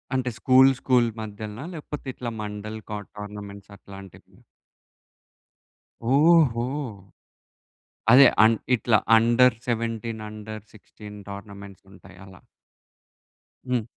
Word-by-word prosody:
అంటే 130 Hz, -1 st, -1 dB
school, 130 Hz, +1 st, +5 dB
school 120 Hz, -3 st, +2 dB
మధ్యలనా? 110 Hz, +4 st, -8 dB
లేపోతే, 150 Hz, -2 st, -8 dB
ఇట్లా 120 Hz, -2 st, -6 dB
మండల్ 105 Hz, +1 st, -6 dB
కాట్ 105 Hz, -1 st, -6 dB
టోర్నమెంట్స్ 100 Hz, -1 st, -9 dB
అట్లాంటివి? 95 Hz, -1 st, -14 dB, 1.7 s
ఓహో! 145 Hz, -5 st, +4 dB, 1.5 s
అదే. 135 Hz, +2 st, +9 dB, 0.2 s
అన్ 115 Hz, 0 st, +3 dB, 0.2 s
ఇట్లా 120 Hz, -1 st, +2 dB, 0.2 s
అండర్ 120 Hz, +2 st, +4 dB
17, 115 Hz, -1 st, -3 dB
అండర్ 110 Hz, 0 st, -9 dB
16 105 Hz, 0 st, -13 dB
టోర్నమెంట్సుంటయి, 100 Hz, -1 st, -12 dB
అలా. 95 Hz, -2 st, -16 dB, 1.3 s
హ్మ్. 125 Hz, -3 st, 0 dB
110 Hz, 90 wpm, -24 LUFS, 105-125 Hz, 1.7 s, అదే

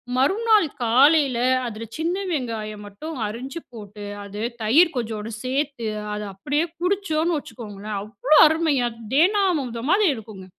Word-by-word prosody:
மறுநாள் 415 Hz, -, +3 dB, 0.2 s
காலையில 265 Hz, +2 st, +4 dB, 0.3 s
அதுல 225 Hz, -1 st, -5 dB
சின்ன 330 Hz, +3 st, -1 dB, 0.2 s
வெங்காயம் 220 Hz, -7 st, -4 dB
மட்டும் 305 Hz, +11 st, -8 dB
அரிஞ்சு 255 Hz, +8 st, -6 dB
போட்டு, 205 Hz, -2 st, -9 dB, 0.2 s
அது 200 Hz, +1 st, -7 dB, 0.2 s
தயிர் 315 Hz, +11 st, +5 dB
கொஞ்சோண்டு 225 Hz, -2 st, -4 dB
சேர்த்து, 265 Hz, -2 st, -2 dB, 0.3 s
அத 210 Hz, -, -4 dB
அப்படியே 290 Hz, -, -1 dB, 0.2 s
குடிச்சோம்ன்னு 350 Hz, -4 st, 0 dB
வச்சுக்கோங்களேன், 210 Hz, -5 st, -7 dB
அவ்வளோ 225 Hz, +9 st, +2 dB
அருமையா 305 Hz, -5 st, +1 dB, 0.3 s
தேனாமுர்தம் 310 Hz, -, +2 dB
மாதிரி 405 Hz, +2 st, +4 dB
இருக்குங்க. 215 Hz, -4 st, -10 dB
260 Hz, 120 wpm, -23 LUFS, 215-320 Hz, 0.3 s, தயிர்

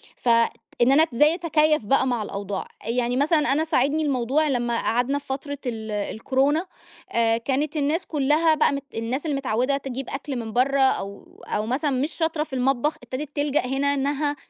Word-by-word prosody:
فإن 235 Hz, +1 st, +1 dB
أنا 295 Hz, +3 st, +6 dB
إزاي 295 Hz, +7 st, +5 dB
أتكيّف 310 Hz, -, +2 dB
بقى 265 Hz, +3 st, +2 dB
مع 240 Hz, -4 st, 0 dB
الأوضاع 200 Hz, -1 st, -5 dB, 0.2 s
يعني 245 Hz, +1 st, 0 dB
مثلًا 300 Hz, +1 st, +2 dB
أنا 305 Hz, +3 st, +1 dB
ساعدني 310 Hz, -1 st, +1 dB
الموضوع 280 Hz, +2 st, +1 dB
لمّا 240 Hz, -3 st, 0 dB
قعدنا 245 Hz, +4 st, 0 dB
في -, -, -22 dB
فترة 285 Hz, +2 st, -4 dB
ال 220 Hz, -3 st, -4 dB
الكورونا 265 Hz, -, 0 dB, 0.4 s
آآ 230 Hz, -1 st, +2 dB
كانت 280 Hz, +6 st, -1 dB
الناس 305 Hz, +5 st, 0 dB
كلها 305 Hz, +2 st, +2 dB
بقى 305 Hz, -, +3 dB
مت 280 Hz, 0 st, -3 dB
الناس 240 Hz, +7 st, -3 dB
اللي 295 Hz, -3 st, 0 dB
متعودة 255 Hz, +1 st, 0 dB
تجيّب 270 Hz, -1 st, -6 dB
أكل 275 Hz, 0 st, -5 dB
من 225 Hz, -2 st, -5 dB
برة 275 Hz, +3 st, +2 dB
أو 200 Hz, -7 st, -1 dB
أو 210 Hz, -, -1 dB
مثلًا 275 Hz, +6 st, 0 dB
مش 275 Hz, +4 st, -1 dB
شاطرة 320 Hz, -2 st, 0 dB
في 310 Hz, -, -14 dB
المطبخ، 265 Hz, +3 st, +1 dB
ابتدت 270 Hz, +5 st, -6 dB
تلجأ 290 Hz, -2 st, +1 dB
هنا 275 Hz, +2 st, +1 dB
إنها 285 Hz, +1 st, 0 dB
270 Hz, 175 wpm, -24 LUFS, 240-295 Hz, 0.4 s, أنا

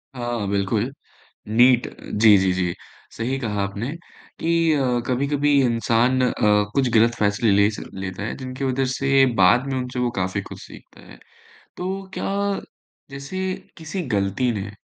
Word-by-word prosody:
हाँ, 120 Hz, -4 st, -3 dB
बिल्कुल। 100 Hz, +5 st, 0 dB, 0.6 s
नीट 120 Hz, +3 st, +4 dB
जी, 105 Hz, -1 st, +4 dB
जी, 95 Hz, -1 st, +2 dB
जी। 90 Hz, -2 st, -1 dB, 0.4 s
सही 125 Hz, +4 st, -3 dB
कहा 105 Hz, -5 st, -2 dB
आपने, 100 Hz, +7 st, -4 dB, 0.5 s
कि 165 Hz, -1 st, +2 dB
अ, 125 Hz, -4 st, +1 dB
कभी-कभी 140 Hz, +3 st, +1 dB
इंसान 120 Hz, +1 st, +2 dB
अ, 125 Hz, -, +2 dB, 0.4 s
कुछ 135 Hz, -2 st, +2 dB
गलत 115 Hz, +1 st, +4 dB
फ़ैसले 105 Hz, +1 st, +2 dB
ले 100 Hz, +1 st, +4 dB
स -, -, -7 dB
लेता 95 Hz, +1 st, -5 dB
है, 110 Hz, -, -4 dB
जिनकी 130 Hz, +1 st, -6 dB
वजह 130 Hz, 0 st, 0 dB
से 135 Hz, 0 st, +3 dB
बाद 115 Hz, +8 st, +4 dB
में 135 Hz, -1 st, -2 dB
उनसे 125 Hz, 0 st, -4 dB
वो 125 Hz, -1 st, +1 dB
काफ़ी 90 Hz, 0 st, -1 dB
कुछ -, -, -11 dB
सीखता -, -, -15 dB
है। -, -, -14 dB, 0.6 s
तो 190 Hz, +2 st, -4 dB
क्या -, -, -3 dB, 0.8 s
जैसे 140 Hz, +7 st, -6 dB, 0.3 s
किसी 165 Hz, +3 st, -5 dB
गलती 100 Hz, +5 st, 0 dB
ने 100 Hz, -1 st, -5 dB
120 Hz, 155 wpm, -22 LUFS, 105-135 Hz, 0.8 s, नीट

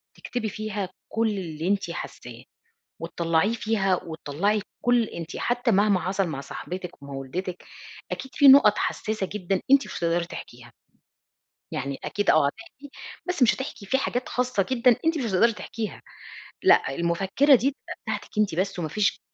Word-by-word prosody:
تكتبي 235 Hz, -3 st, -4 dB
فيها 210 Hz, -2 st, -4 dB, 0.2 s
كل 225 Hz, 0 st, +1 dB
اللي 170 Hz, -5 st, -4 dB
أنتِ 195 Hz, -3 st, 0 dB
حاساه 170 Hz, -, -8 dB, 0.6 s
وتطلّعيه 170 Hz, +5 st, +1 dB
فيها، 210 Hz, -5 st, +1 dB
وتطلّعي 170 Hz, +6 st, -1 dB, 0.2 s
كل 245 Hz, -1 st, +3 dB
أنتِ 170 Hz, -6 st, -7 dB
حتى 245 Hz, 0 st, 0 dB
مهما 200 Hz, -2 st, +3 dB
حصل 190 Hz, +2 st, 0 dB
مع 140 Hz, -4 st, -4 dB
صاحبتِك 180 Hz, +3 st, -7 dB
ومع 140 Hz, 0 st, -9 dB
والدتِك 175 Hz, +7 st, -5 dB, 0.5 s
أكيد 265 Hz, 0 st, -6 dB
في 285 Hz, -2 st, +6 dB
نُقط 265 Hz, -6 st, +8 dB
حساسة 215 Hz, -3 st, -2 dB
جدًا 195 Hz, -2 st, -1 dB
أنتِ 275 Hz, 0 st, +6 dB
مش -, -, -6 dB
هتقدري 170 Hz, 0 st, +1 dB
تحكيها. 120 Hz, -7 st, -10 dB, 1.0 s
يعني 140 Hz, 0 st, -3 dB
أكيد 205 Hz, -1 st, -1 dB
آه 155 Hz, -2 st, +5 dB
هتحكي 245 Hz, -, -9 dB, 0.4 s
بس 360 Hz, -4 st, -2 dB
مش 235 Hz, -, +4 dB
هتحكي 265 Hz, -6 st, -6 dB
في 265 Hz, -, +1 dB
حاجات 250 Hz, -1 st, -2 dB
خاصة 250 Hz, -6 st, 0 dB
جدًا 250 Hz, -1 st, +4 dB
أنتِ 325 Hz, 0 st, +2 dB
مش 275 Hz, -, -2 dB
هتقدري 225 Hz, +3 st, +3 dB
تحكيها، 215 Hz, 0 st, -6 dB, 0.6 s
لأ، -, -, +4 dB
المفكرة 195 Hz, -, +3 dB
دي 260 Hz, +2 st, +3 dB
تبقى 280 Hz, -, -10 dB
بتاعتِك -, -, -4 dB
أنتِ 210 Hz, -5 st, +2 dB
بس، 190 Hz, +2 st, -1 dB
ومافيش 200 Hz, +6 st, 0 dB
200 Hz, 155 wpm, -25 LUFS, 170-235 Hz, 1.0 s, نُقط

